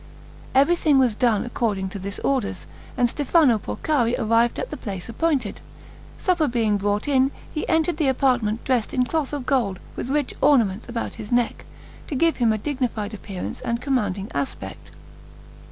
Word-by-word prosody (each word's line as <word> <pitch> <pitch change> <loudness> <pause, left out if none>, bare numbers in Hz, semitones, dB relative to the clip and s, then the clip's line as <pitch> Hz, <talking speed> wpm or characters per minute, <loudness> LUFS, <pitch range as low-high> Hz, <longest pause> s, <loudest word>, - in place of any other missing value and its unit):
Everything 300 +1 +4
was 255 -4 +4
done 220 -1 +2
according 215 -5 -1
to 200 - -6
this 200 +2 -5
orders, 245 -9 -1 0.3
and 245 - +4
Stefano 285 -2 +3
Porcari 235 - 0
arrived 230 +2 +2
at - - -4
the - - -3
place 190 -4 -6
appointed. 255 -2 -1 0.6
Supper 350 -5 +1
being 225 -4 +1
brought 205 +3 -1
in, 270 -2 +3 0.2
he 305 - -3
entered 320 0 +2
the 310 -4 +1
apartment 245 -4 +1
dressed 250 -4 0
in 250 -1 +3
cloth 310 0 -1
of 285 -4 -4
gold, 230 -10 +1 0.2
with 245 - -4
rich 290 -1 0
ornaments 230 -7 +3
about 235 -1 -3
his 210 - -8
neck, 240 -1 +1 0.4
to 290 - -4
give 330 +4 +2
him 235 -3 +3
a 215 - +1
dignified 230 -4 -2
appearance 195 -3 -6
and 235 0 -1
commanding 210 -7 -1
aspect. 135 -9 -5
240 Hz, 165 wpm, -23 LUFS, 210-275 Hz, 0.6 s, Everything